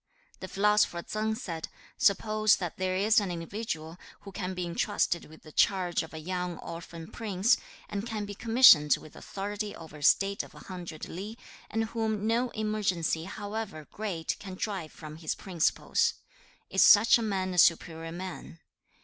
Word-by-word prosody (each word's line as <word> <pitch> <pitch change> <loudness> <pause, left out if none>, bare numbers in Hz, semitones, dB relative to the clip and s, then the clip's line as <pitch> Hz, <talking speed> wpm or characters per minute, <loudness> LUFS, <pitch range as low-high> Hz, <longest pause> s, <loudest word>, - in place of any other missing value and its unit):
The 185 - -6
philosopher 200 -3 +2
Tsang 215 +1 -2
said, 170 -8 -5 0.3
'Suppose 215 +1 +3
that 175 -3 -5
there 185 0 -1
is 210 +4 +4
an 200 -3 -2
individual 170 -2 -5 0.2
who 200 - -10
can 185 -1 -4
be 180 -1 -2
entrusted 170 0 0
with 155 +1 -16
the 155 - -13
charge 180 0 +2
of 160 - -9
a 160 - -8
young 180 +1 -3
orphan 165 0 -8
prince, 210 -1 +2 0.3
and 200 0 -4
can 215 -3 -3
be 205 - -6
commissioned 215 - +6
with 155 - -14
authority 205 +1 -5
over 160 -2 -11
a - - -13
state 195 +6 +4
of - - -13
a - - -11
hundred 175 -4 -7
li, 205 +6 -7 0.3
and 225 0 0
whom 220 -2 -2
no 235 +3 +1
emergency 195 -7 0
however 205 -4 -5
great 190 -7 -3
can 190 -2 -8
drive 185 -6 -4
from 155 -1 -10
his 160 -1 -3
principles: 175 -5 +1 0.6
is 190 - +3
such 220 +4 +8
a - - -2
man 190 -4 -1
a 180 - +1
superior 165 0 +3
man? 175 -1 -7
190 Hz, 165 wpm, -29 LUFS, 170-215 Hz, 0.6 s, such